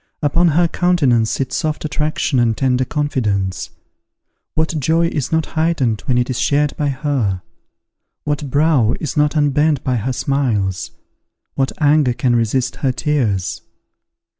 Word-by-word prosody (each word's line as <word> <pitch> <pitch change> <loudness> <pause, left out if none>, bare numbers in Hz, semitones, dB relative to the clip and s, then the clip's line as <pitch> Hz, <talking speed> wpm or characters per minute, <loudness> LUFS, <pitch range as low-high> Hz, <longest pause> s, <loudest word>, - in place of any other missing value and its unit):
Upon 165 +4 +3
her 170 +2 +3
countenance 140 -12 +2
sit 135 -2 -2
soft 155 -2 -2
attraction 150 -2 -1
and 115 -2 +1
tender 130 -1 +1
confidence. 105 - -1 0.9
What 160 0 0
joy 165 +4 +2
is 145 -6 -3
not 160 -1 +1
heightened 155 -9 0
when 125 -3 +2
it 120 0 +1
is 130 - -3
shared 145 0 +1
by 145 -1 -1
her? 130 -9 -1 0.8
What 145 -1 -2
brow 140 -5 +2
is 155 - -4
not 150 +1 +2
unbent 150 0 +2
by 125 -1 0
her 125 +4 -2
smiles? 115 -10 -1 0.6
What 135 -1 0
anger 145 -4 +3
can 120 0 +1
resist 120 +3 0
her 135 - 0
tears? 105 - -1
140 Hz, 140 wpm, -18 LUFS, 120-150 Hz, 0.9 s, Upon